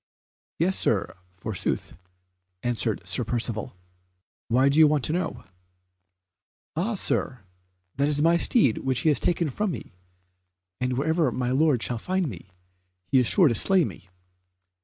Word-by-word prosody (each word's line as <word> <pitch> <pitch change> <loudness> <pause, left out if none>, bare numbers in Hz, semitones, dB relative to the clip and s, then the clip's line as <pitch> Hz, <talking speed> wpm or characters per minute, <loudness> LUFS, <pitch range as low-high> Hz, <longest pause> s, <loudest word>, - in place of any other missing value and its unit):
"Yes, 185 +4 +1
Sir, 105 - 0 0.2
forsooth," 95 +2 -3 0.7
answered 115 -6 -1
Sir 95 +7 0
Percivale, 115 -4 -3 0.7
"why 130 +4 +3
do 140 +3 +3
you 155 - +8
want 150 -3 +1
to 155 - 0
know?" 180 +1 -3 1.3
"Ah, 200 +8 -1
Sir, 130 - -2 0.5
that 140 +1 +2
is 145 -1 +2
my 165 +3 +4
steed 170 - +2
which 130 -2 -1
he 160 - +3
has 150 - +2
taken 170 -4 0
from 210 +8 -1
me, 165 - -7 0.9
and 125 0 -1
wherever 160 0 +1
my 125 +1 -2
lord 135 -3 +2
shall 120 0 -2
find 185 +5 -1
me, 95 - -8 0.6
he 130 +8 +3
is 125 - +2
sure 185 -5 +5
to 125 - +2
slay 185 - +3
me." 95 -2 -10
135 Hz, 150 wpm, -25 LUFS, 115-165 Hz, 1.3 s, you